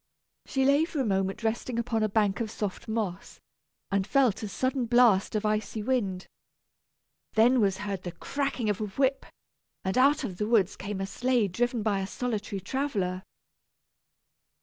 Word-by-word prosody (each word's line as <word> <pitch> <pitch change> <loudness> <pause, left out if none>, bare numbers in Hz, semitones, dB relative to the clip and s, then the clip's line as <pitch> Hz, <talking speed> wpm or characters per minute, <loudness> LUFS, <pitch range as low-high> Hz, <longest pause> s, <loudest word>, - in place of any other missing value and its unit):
She 265 -1 +1
lay 280 +3 +5
for 325 -3 -3
a 265 - +1
moment 195 +1 -1
resting 230 +2 -1
upon 235 -1 0
a 215 - +2
bank 205 -1 +1
of 225 -2 -2
soft 210 -1 -4
moss, 215 -5 -3 0.5
and 195 0 +1
felt 260 -6 +3
a 215 - -3
sudden 255 +3 -1
blast 235 -5 +4
of 215 0 0
icy 215 0 -1
wind. 205 -7 -1 1.1
Then 240 +3 +5
was 195 -2 +2
heard 200 -2 -4
the 180 - -5
cracking 275 +2 -2
of 210 0 0
a - - 0
whip, 270 +6 0 0.6
and 190 - 0
out 285 +3 +4
of 190 -8 -4
the 210 - -1
woods 210 -4 +3
came 200 0 -5
a - - -1
sleigh 240 +2 +1
driven 235 +4 -1
by 205 -2 +1
a 190 - -3
solitary 210 -3 -3
traveller. 200 -5 -2
215 Hz, 170 wpm, -28 LUFS, 195-250 Hz, 1.1 s, lay